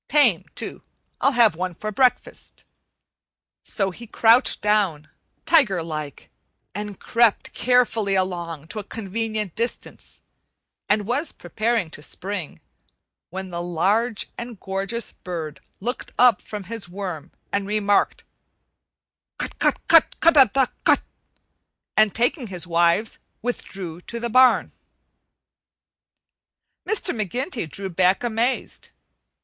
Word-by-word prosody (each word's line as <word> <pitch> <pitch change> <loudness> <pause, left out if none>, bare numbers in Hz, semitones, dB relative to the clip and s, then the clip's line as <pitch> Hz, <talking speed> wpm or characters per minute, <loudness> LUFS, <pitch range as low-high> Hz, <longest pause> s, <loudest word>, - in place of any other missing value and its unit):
Tame, 255 - +4
too. - - -5 0.4
I'll 275 - +3
have 230 -7 +5
one 180 +1 -3
for 215 +5 -4
breakfast." 250 +4 0 1.0
So 195 -3 -1
he 235 +6 -11
crouched 230 +3 +4
down, 200 -8 +1 0.4
tiger 210 - +4
like, 155 -3 -6 0.4
and 205 -1 -6
crept 230 -2 +2
carefully 230 -5 +2
along 170 -4 -2
to 215 - -4
a - - -5
convenient 215 -1 -4
distance 235 +1 -4 0.7
and 210 -1 +2
was 280 +8 0
preparing 215 -1 -1
to 150 - -10
spring, 185 +1 -5 0.7
when 190 +1 -6
the 170 0 -3
large 200 +7 +1
and 235 -3 -7
gorgeous 195 +4 -3
bird 160 -4 -6 0.2
looked 240 +5 -4
up 245 -6 +5
from 210 -2 -7
his 210 -2 -6
worm 180 -4 -6 0.2
and 200 -1 -1
remarked: 205 -1 +1 1.1
"Cut - - -5
cut - - +1
cut, - - +5
ca 335 - +6
dah 270 -3 +5 0.2
cut!" - - +4 0.9
and, 215 -2 +4
taking 245 +2 0
his 180 -3 -5
wives, 170 +5 +2 0.2
withdrew 190 -8 -5
toward 235 +5 -7
the 235 - -1
barn. 255 +1 +5 2.2
Mr. 410 -6 0
McGinty 230 - -3
drew 195 +5 -5
back 185 +4 +2
amazed. 240 +2 -1
205 Hz, 120 wpm, -23 LUFS, 180-235 Hz, 2.2 s, ca